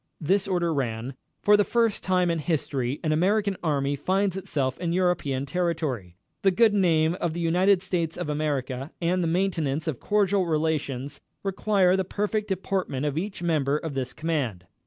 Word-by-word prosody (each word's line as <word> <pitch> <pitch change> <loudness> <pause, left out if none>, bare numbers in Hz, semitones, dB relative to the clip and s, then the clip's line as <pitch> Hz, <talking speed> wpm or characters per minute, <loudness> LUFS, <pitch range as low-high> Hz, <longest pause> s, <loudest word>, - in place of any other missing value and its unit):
This 190 +5 +1
order 175 -3 +1
ran: 125 -2 -2 0.3
"For 210 - +6
the 205 - +4
first 230 -1 +1
time 180 -2 +2
in 165 - -1
history 140 -4 -1
an 155 - +1
American 200 +5 +2
Army 145 -3 0
finds 190 +6 0
itself 145 -9 -2
in 170 -1 -1
European 175 -7 0
territory. 145 - -2 0.3
The 195 - +4
good 220 +3 +4
name 165 -5 +3
of 170 -2 -1
the - - -3
United 180 +3 +3
States 170 -4 -2
of - - -3
America 140 -3 -2
and 180 +2 +1
the 170 - 0
maintenance 165 -4 0
of 150 -7 -2
cordial 200 -3 +2
relations 150 -4 -1 0.2
require 195 -1 +2
the 190 - +1
perfect 210 +3 -2
deportment 185 -7 -2
of 145 -1 -1
each 190 +2 -4
member 150 -4 +1
of 155 -1 -5
this 130 -2 -3
command. 140 - -2
165 Hz, 170 wpm, -26 LUFS, 145-190 Hz, 0.3 s, For